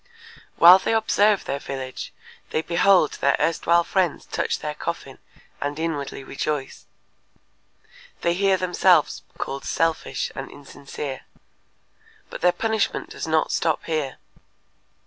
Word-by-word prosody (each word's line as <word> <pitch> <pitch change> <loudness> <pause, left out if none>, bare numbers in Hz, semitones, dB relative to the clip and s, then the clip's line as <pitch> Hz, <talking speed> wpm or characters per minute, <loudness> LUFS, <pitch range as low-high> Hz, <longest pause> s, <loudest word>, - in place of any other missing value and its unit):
While 180 +3 +9
they 225 - 0
observe 215 -2 +2
their 140 - -3
village 130 -2 -6 0.4
they 155 - -1
behold 175 -1 +3
their 140 - +3
erstwhile 170 +1 +2
friends 180 -3 -1
touch - - -2
their 150 - -5
coffin 150 -3 -6 0.4
and 145 +1 -3
inwardly 155 -4 -3
rejoice. 140 +1 -4 1.3
They 170 - +2
hear 195 +1 +2
themselves 180 -3 +2 0.2
called 135 0 -4
selfish 165 -1 -1
and 135 -1 -7
insincere. 140 -1 -8 1.1
But - - -7
their 180 - +5
punishment 220 +2 -1
does - - -6
not 160 0 +1
stop 160 -1 0
here. 155 -5 -2
160 Hz, 120 wpm, -23 LUFS, 140-180 Hz, 1.3 s, While